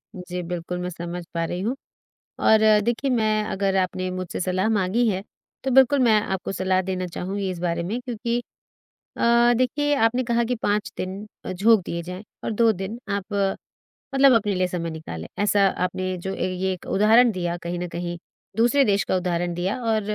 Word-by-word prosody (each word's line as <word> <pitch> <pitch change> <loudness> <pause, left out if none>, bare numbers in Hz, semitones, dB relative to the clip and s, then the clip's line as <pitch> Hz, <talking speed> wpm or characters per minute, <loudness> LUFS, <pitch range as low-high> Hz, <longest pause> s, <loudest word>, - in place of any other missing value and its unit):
जी, 180 0 -5
बिल्कुल 175 0 -4
मैं 180 - -3
समझ 175 0 -6
पा 165 -1 -1
रही 175 +2 -4
हूँ। 235 +6 -1 0.7
और 220 - +6 0.3
देखिए 240 +4 0
मैं 215 -3 +2
अगर 195 -1 -1
आपने 185 0 -1
मुझसे 185 -1 -4
सलाह 185 +3 0
माँगी 215 +3 +2
है 190 -2 -1 0.4
तो 265 - 0
बिल्कुल 265 +2 +5
मैं 220 -3 +5
आपको 190 -2 -3
सलाह 185 0 +1
देना 185 -1 -3
चाहूँगी 190 +3 -3
इस 180 - -5
बारे 170 -1 -1
में। 210 +8 -3
क्योंकि 240 -1 -2 0.8
अ, 235 +1 +5
देखिए 290 +4 +1
आपने 245 0 +2
कहा 235 0 +1
कि 245 +2 -1
5 210 +2 0
दिन 190 +3 -5 0.3
झोंक 210 +3 +4
दिए 170 0 -4
जाएँ 180 +4 -7 0.2
और - - -1
2 230 +1 +4
दिन 210 +5 -4
आप 200 -1 -1 0.9
मतलब 270 -1 +6
अपने 205 -2 +1
लिए 185 0 +1
समय 170 -2 -3
निकालें। 85 - -7 0.2
ऐसा 200 -1 +4 0.2
आपने 185 0 -2
जो 190 +2 -4
अ, - - -7
ये 185 +1 -1
एक 180 - -10
उदाहरण 225 +4 +5
दिया, 175 -2 -2
कहीं 175 0 -4
न 180 - -3
कहीं 175 0 -4 0.4
दूसरे 240 +5 +4
देश 200 -1 +2
का - - -1
उदाहरण 175 -1 -1
दिया 180 +5 -2
और 220 -1 +2
190 Hz, 190 wpm, -24 LUFS, 180-225 Hz, 0.9 s, और